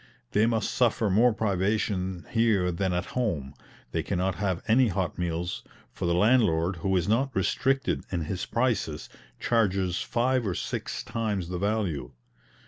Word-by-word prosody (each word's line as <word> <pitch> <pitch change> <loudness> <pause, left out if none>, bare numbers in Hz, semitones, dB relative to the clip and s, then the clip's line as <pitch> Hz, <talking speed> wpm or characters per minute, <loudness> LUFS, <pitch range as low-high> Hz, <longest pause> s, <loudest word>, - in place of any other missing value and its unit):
They 110 +2 +3
must 115 -3 0
suffer 115 -3 +2
more 115 +6 +5
privation 95 -3 -1
here 110 -6 +2
than 95 +2 -1
at 90 +1 -1
home; 85 - -1 0.4
they - - 0
cannot 95 +2 -1
have 95 -2 -2
any 120 +3 +5
hot 95 -4 -2
meals, 85 0 -2 0.3
for 85 - -3
the 85 - +2
landlord, 95 -5 +3
who 95 +3 +1
is 85 - 0
not 120 +6 +2
restricted 135 +8 +1
in 90 -3 -1
his 90 +4 -3
prices, 115 - -1 0.3
charges 95 -6 +1
five 125 -1 +1
or 90 - -1
six - - -4
times 105 -6 -2
the 90 -1 -3
value. 95 - -1
95 Hz, 150 wpm, -27 LUFS, 90-115 Hz, 0.4 s, more